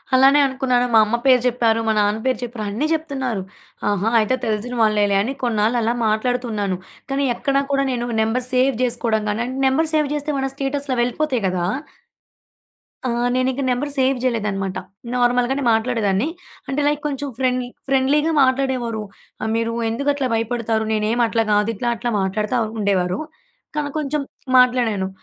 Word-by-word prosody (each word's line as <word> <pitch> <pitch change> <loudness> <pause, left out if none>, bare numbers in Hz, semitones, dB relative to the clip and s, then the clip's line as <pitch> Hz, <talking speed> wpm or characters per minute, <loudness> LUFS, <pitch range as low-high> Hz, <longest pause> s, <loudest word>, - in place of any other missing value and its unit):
అలానే 270 +2 +6
అనుకున్నాను. 260 -2 +1
మా 225 - +8
అమ్మ 215 +3 0
పేరు 255 -2 +6
చెప్పారు, 230 -2 +2
మా - - +3
నాన్న 210 +1 +1
పేరు 255 -4 +1
చెప్పారు 235 -2 -5
అన్నీ 225 +9 -1
చెప్తున్నారు. 265 -9 -2 0.5
ఆహా! 205 +2 +1
అయితే 220 +4 +2
తెలిసిన 220 +2 -2
వాళ్ళేలే 210 -2 +2
అని 250 +6 -2
కొన్నాళ్ళు 225 0 +1
అలా 230 +2 +1
మాట్లాడుతున్నాను. 215 -3 -1 0.3
కానీ, 275 +1 0
ఎక్కడ 275 +2 0
కూడా 275 0 +2
నేను 240 -1 -2
నంబర్ 235 +3 0
సేవ్ 255 +1 +3
చేసుకోవడం 230 -3 0
కానీ, 220 +3 -1 0.2
నంబర్ 315 +4 +1
సేవ్ 305 -1 +2
చేస్తే 295 +1 -2
మన 270 - 0
స్టేటస్‌లు 275 -1 -2
వెళ్ళిపోతాయి 250 +1 0
కదా! 180 -1 -1 1.4
ఆ! - - 0 0.3
నేనింక 255 +1 0
నెంబర్ 260 +4 -1
సేవ్ 265 0 +2
చేయలేదన్నమాట. 205 -6 -1 0.4
నార్మల్‍గానే 245 +2 +2
మాట్లాడేదాన్ని. 220 -1 +1 0.4
అంటే, 275 +2 -1
లైక్, 295 0 0
కొంచెం 285 0 -3
ఫ్రెండ్లీ 255 -1 0 0.2
ఫ్రెండ్లీగా 280 +4 +2
మాట్లాడేవారు. 260 -4 0 0.4
ఆహ్, 220 - -1
"మీరు 230 0 0 0.2
ఎందుకు 280 +6 -1
అట్లా 280 -2 -1
భయపడతారు, 225 -1 -1
నేనేమి 220 +3 +1
అట్లా 225 0 +1
గాదు" 210 +2 +2
ఇట్లా, 240 +4 -3
అట్లా 240 +2 -3
మాట్లాడుతూ 210 +5 -1 0.2
ఉండేవారు. 185 -3 +1 0.6
కా 300 - +1 0.2
కొంచెం 300 -1 -1 0.4
మాట్లాడాను 240 -6 +3
245 Hz, 150 wpm, -21 LUFS, 220-265 Hz, 1.4 s, మా